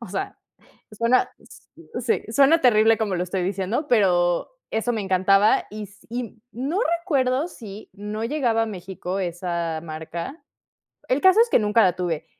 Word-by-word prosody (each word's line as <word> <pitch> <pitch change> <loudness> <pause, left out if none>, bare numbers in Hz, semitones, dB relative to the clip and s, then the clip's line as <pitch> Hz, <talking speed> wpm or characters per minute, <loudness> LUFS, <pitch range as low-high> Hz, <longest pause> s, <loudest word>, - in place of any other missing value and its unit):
O 235 - -8
sea, 195 +1 -4 0.5
suena, 230 +4 +2
s - - -17 0.4
sí, 450 - 0
suena 280 +6 +5
terrible 225 -2 +5
como 205 -4 -1
lo 180 - -1
estoy 185 +1 -3
diciendo, 195 - -2
pero 175 -6 +2 0.2
eso 225 +2 -1
me 225 - -2
encantaba. 195 +2 +3
Y 215 0 -7
s 205 +1 -17
y 235 -1 -6
no 275 - -2 0.2
recuerdo 275 -2 0
si 215 - -11
no 210 +2 -5
llegaba 235 -4 +1
a - - -1
México 190 -2 -5
esa 170 -3 -3
marca, 170 - -7 0.7
el 260 +3 +1
caso 375 +3 +6
es 470 - -1
que - - +5
nunca 210 +1 +3
la 185 - +4
tuve. 170 -4 -3
215 Hz, 165 wpm, -23 LUFS, 185-245 Hz, 0.7 s, caso